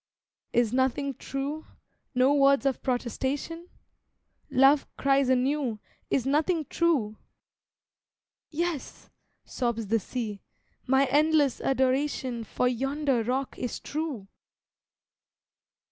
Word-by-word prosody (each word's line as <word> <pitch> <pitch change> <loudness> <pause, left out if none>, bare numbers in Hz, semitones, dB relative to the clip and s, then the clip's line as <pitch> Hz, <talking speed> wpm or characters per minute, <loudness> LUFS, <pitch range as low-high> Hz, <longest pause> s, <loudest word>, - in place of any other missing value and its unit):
Is 235 -1 +2
nothing 265 +2 +1
True? 275 +5 -5 0.5
No 255 +3 +4
words 275 -1 +4
of 270 -2 0
protestation? 270 +7 -3 0.8
Love 275 +1 +4
cries 275 -1 +2
anew 260 -2 +1 0.3
"Is 260 - +1
nothing 310 +3 +1
True?" 270 -12 +1 1.3
"Yes," 335 -2 -4 0.3
sobs 235 -3 -2
the 225 +3 +1
sea, 215 -2 -5 0.5
"My 265 +2 +4
endless 295 0 +2
adoration 260 -2 0
For 250 +3 -1
yonder 270 +1 0
rock 260 +3 -2
is 245 - -3
true!" 290 -10 -4
270 Hz, 95 wpm, -27 LUFS, 250-290 Hz, 1.3 s, No